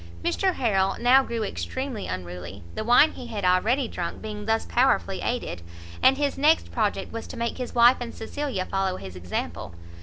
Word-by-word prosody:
Mr 375 -2 +1
Harrel 195 -5 +1
now 250 +3 +6
grew 235 -4 -3
extremely 260 +1 -4
unruly, 90 +1 -6
the - - -3
wine 245 +7 +6
he 245 - -9
had 210 -5 -4
already 220 +9 +2
drunk 175 -5 -5
being 210 -1 -6
thus 225 0 +1
powerfully 240 -6 +1
aided; 240 - -3 0.4
and 265 +1 +5
his 285 -1 -1
next 305 +3 +3
project 210 -3 -1
was 230 - -5
to - - -8
make 235 +2 -2
his 250 -1 -5
wife 240 +2 +7
and 240 -1 -6
Cecilia 225 -4 -3
follow 195 -1 -1
his 95 -2 -9
example. 90 -1 -5
225 Hz, 180 wpm, -25 LUFS, 190-250 Hz, 0.4 s, wife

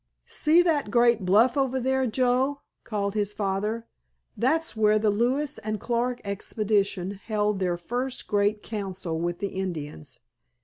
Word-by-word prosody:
"See 325 +3 +3
that 305 -9 +1
great 235 -3 +3
bluff 220 +7 +4
over 265 -2 +1
there, 265 +1 +1
Joe?" 255 +4 +1 0.2
called 200 -2 -2
his 210 -1 -1
father. 210 +3 -2 0.5
"That's 320 +5 +1
where 215 -1 +4
the 215 0 +2
Lewis 260 +7 0
and 215 0 -3
Clark 240 +2 -1
Expedition 200 -1 -1
held 210 -2 0
their 180 -2 0
first 245 +8 -3
great 205 +1 +1
council 190 -6 -3
with 175 +1 -2
the 200 - -3
Indians. 155 -7 -6
215 Hz, 140 wpm, -26 LUFS, 200-250 Hz, 0.5 s, bluff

